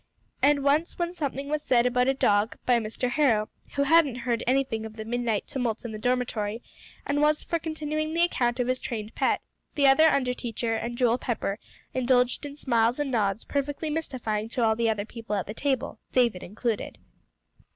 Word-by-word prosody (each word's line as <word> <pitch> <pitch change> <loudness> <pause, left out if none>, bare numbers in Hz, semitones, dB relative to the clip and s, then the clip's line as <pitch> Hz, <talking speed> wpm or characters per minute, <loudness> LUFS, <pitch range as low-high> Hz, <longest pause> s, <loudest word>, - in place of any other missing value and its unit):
And 285 +1 +4
once 295 +5 +2
when 345 0 -1
something 280 -4 -3
was 300 +1 -1
said 245 -4 +3
about 250 0 +2
a 270 - +2
dog 205 -3 +2
by 245 -1 +4
Mr. 225 +3 -3
Harrow, 235 -9 +2 0.3
who 280 - +2
hadn't 290 -3 +4
heard 235 -2 0
anything 255 -4 +1
of 220 -1 -8
the 220 -1 -6
midnight 230 -2 -1
tumult 240 -4 -3
in 235 - -4
the 215 - -6
dormitory, 235 -2 -1 0.4
and 285 +1 0
was 300 0 +3
for 335 - -1
continuing 310 -1 -3
the 335 +1 +2
account 245 -7 +1
of 245 - +2
his 255 +1 0
trained 220 -4 -5
pet, - - +1 0.3
the 285 -2 +3
other 275 +4 +7
under 265 -5 +3
teacher 230 -1 -3
and 235 +1 -3
Joel 245 0 +3
Pepper 225 -4 -2 0.3
indulged 250 +2 +2
in 285 - -9
smiles 240 -3 +1
and 290 -2 -1
nods 215 -3 0
perfectly 290 +2 -2
mystifying 240 -9 -2
to 245 0 -1
all 220 -1 +3
the 230 0 +1
other 210 -2 -1
people 225 -2 -5
at 195 - -1
the 210 - -6
table, 265 +1 -1
David 240 -7 +2
included. 220 +3 -3
250 Hz, 195 wpm, -27 LUFS, 225-285 Hz, 0.4 s, other